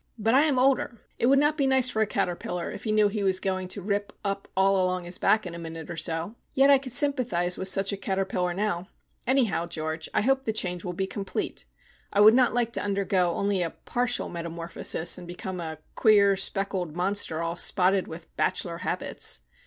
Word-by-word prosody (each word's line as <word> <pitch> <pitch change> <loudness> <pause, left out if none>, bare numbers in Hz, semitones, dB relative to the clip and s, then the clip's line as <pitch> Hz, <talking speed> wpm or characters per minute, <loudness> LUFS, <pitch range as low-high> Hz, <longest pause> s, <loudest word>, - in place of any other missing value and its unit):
But 225 +1 +1
I 280 +4 +5
am 285 -4 +1
older. 255 -3 +1 0.2
It 235 - +2
would 275 +1 +5
not 295 +2 +3
be 275 -3 +2
nice 265 -1 +4
for 220 -3 -1
a 220 - +2
caterpillar 180 -3 -3
if - - -9
he 215 - 0
knew 215 -1 +4
he 205 +1 -3
was 190 -1 +2
going 185 -1 -2
to 190 +1 -5
rip 205 +1 -2
up 200 -1 -3
all 195 0 +3
along 185 0 -1
his 175 +1 -1
back 215 -1 +2
in 175 - -6
a 170 - -7
minute 165 0 -7
or - - -5
so. 165 +4 -3 0.2
Yet 275 +1 +5
I 275 - +6
could 260 -2 -8
sympathise 235 -10 +2
with 190 - -2
such 195 +1 +3
a - - -3
caterpillar 190 -2 -1
now. 185 -3 -2 0.4
Anyhow, 235 -10 +1
George, 160 0 -4
I - - +1
hope 270 +4 +1
the 220 - -1
change 180 -5 -2
will 180 - -4
be 190 +2 -2
complete. 195 0 -4 0.5
I 200 - 0
would 215 +1 +8
not 250 0 +4
like 235 -1 0
to - - -1
undergo 195 -3 0
only 200 -2 0
a 170 - 0
partial 245 +8 -1
metamorphosis, 170 0 -1
and 175 - -10
become 180 +1 -6
a 160 -2 -5 0.2
queer 200 -3 +4
speckled 190 -4 -1
monster 180 -3 0
all 165 0 -2
spotted 185 +2 +2
with 165 +1 -11
bachelor 170 -1 -1
habits. - - -2
195 Hz, 210 wpm, -26 LUFS, 175-220 Hz, 0.5 s, would